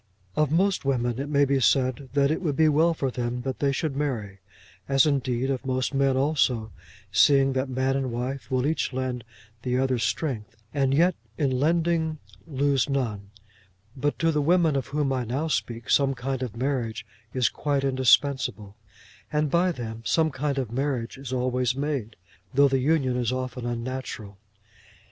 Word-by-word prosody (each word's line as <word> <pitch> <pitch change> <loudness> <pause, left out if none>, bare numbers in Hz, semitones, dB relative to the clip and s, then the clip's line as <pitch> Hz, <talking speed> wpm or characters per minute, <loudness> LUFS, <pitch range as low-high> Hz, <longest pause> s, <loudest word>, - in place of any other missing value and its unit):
Of 150 -2 +2
most 190 +4 +2
women 120 -3 0
it 140 +1 -3
may 145 -1 +4
be 140 0 +1
said 130 0 +1
that 140 0 +3
it 160 - -1
would 150 -6 -1
be 160 +2 +4
well 160 +3 +3
for 135 -4 -1
them 125 0 -3
that 130 -1 -4
they 140 -1 +2
should 140 +1 -2
marry, 115 -9 -3 0.5
as 135 +1 +5
indeed 135 -3 0
of 130 -1 -3
most 130 0 -1
men 135 -1 +2
also, 130 -6 +1 0.4
seeing 135 +5 +5
that 130 +1 -1
man 130 +1 0
and 135 -2 -1
wife 125 +4 -4
will 130 -1 +1
each 155 -2 0
lend 130 -2 -3 0.4
the 125 0 -1
other 130 -1 +1
strength, 115 -5 -2 0.2
and 135 -2 +1
yet 170 +6 +4 0.2
in 140 -3 +1
lending 160 +3 +1 0.3
lose 140 -1 +1
none; 110 -8 -2 0.7
but 145 +2 -1
to 165 0 +2
the 150 -1 +1
women 165 0 +3
of 135 - -1
whom 145 -1 0
I 130 -1 -1
now 130 +7 -2
speak 115 -3 -2
some 135 -1 +3
kind 130 +1 -3
of 120 -3 -4
marriage 125 -4 -2 0.3
is 125 -2 +3
quite 145 -2 -1
indispensable, 130 -5 +2 0.6
and 150 -1 0
by 180 +2 +3
them 115 -6 -6
some 160 +5 +2
kind 140 0 -2
of 130 -5 -2
marriage 130 -2 -2
is 135 -2 -7
always 125 -1 0
made, 135 -6 -3 0.4
though 140 +1 +6
the 135 -1 +1
union 135 -2 +1
is 120 -1 0
often 130 -1 -4
unnatural. 120 -4 -5
135 Hz, 175 wpm, -26 LUFS, 125-145 Hz, 0.7 s, though